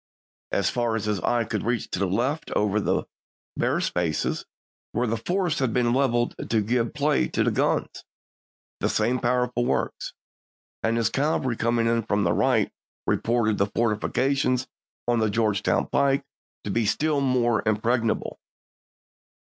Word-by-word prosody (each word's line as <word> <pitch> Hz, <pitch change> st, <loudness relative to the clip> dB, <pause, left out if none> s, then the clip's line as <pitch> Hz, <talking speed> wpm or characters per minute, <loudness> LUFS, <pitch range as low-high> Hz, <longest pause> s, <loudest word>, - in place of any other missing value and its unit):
As 100 Hz, -1 st, +1 dB
far 120 Hz, -2 st, 0 dB
as 110 Hz, -, -2 dB
his 105 Hz, -2 st, 0 dB
eye 120 Hz, +7 st, +1 dB
could 110 Hz, -1 st, -3 dB
reach 115 Hz, +1 st, -1 dB
to -, -, -2 dB
the 100 Hz, -, +1 dB
left 125 Hz, -, -1 dB
over 105 Hz, 0 st, +2 dB
the -, -, 0 dB, 0.5 s
bare -, -, +1 dB
spaces 85 Hz, -3 st, -1 dB, 0.5 s
where 120 Hz, +3 st, +1 dB
the 115 Hz, -1 st, 0 dB
forests 175 Hz, -, -1 dB
had 130 Hz, -5 st, 0 dB
been 120 Hz, -1 st, +2 dB
leveled 120 Hz, -3 st, +1 dB, 0.2 s
to 110 Hz, -1 st, +2 dB
give 115 Hz, +4 st, 0 dB
play 150 Hz, 0 st, +2 dB
to -, -, 0 dB
the -, -, +2 dB
guns, -, -, 0 dB, 0.8 s
the -, -, 0 dB
same 120 Hz, +4 st, +1 dB
powerful 125 Hz, 0 st, +1 dB
works; -, -, -2 dB, 0.7 s
and 115 Hz, +1 st, +1 dB
his 115 Hz, -1 st, +1 dB
cavalry 135 Hz, -4 st, 0 dB
coming 115 Hz, 0 st, +1 dB
in 115 Hz, 0 st, +2 dB
from 105 Hz, -2 st, 0 dB
the 85 Hz, -2 st, +2 dB
right -, -, +2 dB, 0.3 s
reported 115 Hz, -3 st, +1 dB
the 100 Hz, -, +3 dB
forti 110 Hz, -2 st, +1 dB
fications 130 Hz, -1 st, +1 dB, 0.4 s
on 120 Hz, -1 st, +2 dB
the 110 Hz, -1 st, +2 dB
Georgetown 105 Hz, -2 st, +1 dB
pike 140 Hz, 0 st, +1 dB, 0.4 s
to 105 Hz, -, -3 dB
be 115 Hz, +1 st, +1 dB
still 150 Hz, +5 st, +1 dB
more 120 Hz, -4 st, +2 dB
impregnable. 115 Hz, +2 st, 0 dB
115 Hz, 160 wpm, -25 LUFS, 110-125 Hz, 0.8 s, the